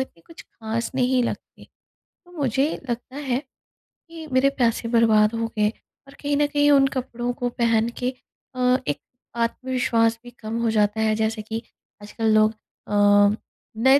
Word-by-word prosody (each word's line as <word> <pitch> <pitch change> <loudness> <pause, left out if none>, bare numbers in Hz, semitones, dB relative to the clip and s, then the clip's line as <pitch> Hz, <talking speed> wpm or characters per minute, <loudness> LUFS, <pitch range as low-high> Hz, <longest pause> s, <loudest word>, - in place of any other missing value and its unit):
इतने 215 -10 -6
कुछ 330 - -13
ख़ास 225 +1 -4
नहीं 255 -1 +2
लगते। - - -6 0.4
तो 355 -1 -24
मुझे 270 0 +1 0.2
लगता 245 +3 -5
है, 265 -4 -1 0.7
कि 325 -1 -9
मेरे 260 +2 +4
पैसे 230 -1 +1
बर्बाद 220 -2 +4
हो 230 0 -1
गए 210 0 +3 0.4
और 275 - -14
कहीं 285 0 0
न 295 - +3
कहीं 290 0 +2
उन 275 -1 +6
कपड़ों 245 -2 -3
को 245 0 0
पहन 230 -1 +1
के 250 +1 -1 0.4
अ, 250 0 +3
एक 145 0 -1 0.4
आत्मविश्वास 230 -1 0
भी 245 - -11
कम 220 +1 -4
हो 230 - +1
जाता 210 0 +1
है, 215 -1 +2
जैसे 220 0 -1
कि 220 +1 -5 0.4
आजकल 220 +1 -1
लोग 215 0 +5 0.4
अ, - - -5 0.8
नए 265 +5 +5
235 Hz, 165 wpm, -23 LUFS, 220-260 Hz, 0.8 s, उन